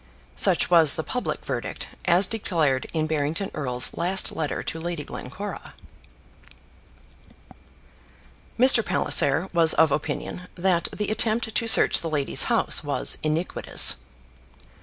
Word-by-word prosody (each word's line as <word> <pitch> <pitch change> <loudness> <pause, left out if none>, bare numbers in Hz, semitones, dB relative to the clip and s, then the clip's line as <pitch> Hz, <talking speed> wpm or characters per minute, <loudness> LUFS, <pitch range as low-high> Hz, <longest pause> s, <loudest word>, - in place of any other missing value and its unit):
Such - - +1
was 165 -4 +5
the 160 - -4
public 250 +8 -5
verdict, - - -5 0.2
as 180 +2 +4
declared 165 - -2
in 160 -2 -2
Barrington 155 +5 -3
Erle's 125 -4 -1
last 185 +3 +1
letter 155 -3 -4
to 165 - -6
Lady 170 -2 -5
Glencora. 200 +13 -9 2.8
Mr. 250 -1 +6
Palliser 160 0 +1
was 165 -2 +3
of 160 -2 +3
opinion 155 +5 -4
that 175 -1 0
the 210 - -4
attempt 220 +1 -1
to 230 - -1
search 225 - +5
the 165 - -4
lady's 145 -3 +1
house - - +1
was - - -1
iniquitous. 155 +3 +2
170 Hz, 120 wpm, -23 LUFS, 155-195 Hz, 2.8 s, Mr